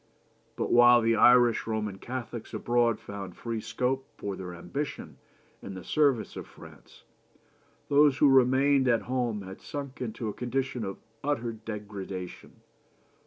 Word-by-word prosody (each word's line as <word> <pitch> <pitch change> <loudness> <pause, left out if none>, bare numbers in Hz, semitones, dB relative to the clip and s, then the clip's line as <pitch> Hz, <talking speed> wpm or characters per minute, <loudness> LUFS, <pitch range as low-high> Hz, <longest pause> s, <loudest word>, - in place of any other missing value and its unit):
But - - -2
while 120 0 +7
the 115 0 +2
Irish 120 0 +5
Roman 105 -3 -3
Catholics 120 -1 -6
abroad 120 -1 +1
found 100 -3 -8
free 115 -2 -4
scope 125 +4 -2
for 100 -1 -4
their 90 -1 -7
ambition 90 +12 -6 0.4
in 100 - -8
the 95 - -8
service 140 - +1
of - - -7
France, - - -16 0.8
those 145 -1 +4
who 145 - +5
remained 135 +1 +4
at 120 -2 +2
home 120 -5 -2
had 95 0 -10
sunk 140 -2 -7
into 115 -1 -4
a 105 - -3
condition 125 +1 -2
of 95 - -5 0.3
utter 125 -5 -1
degradation. 105 -4 -8
120 Hz, 140 wpm, -28 LUFS, 105-130 Hz, 0.8 s, while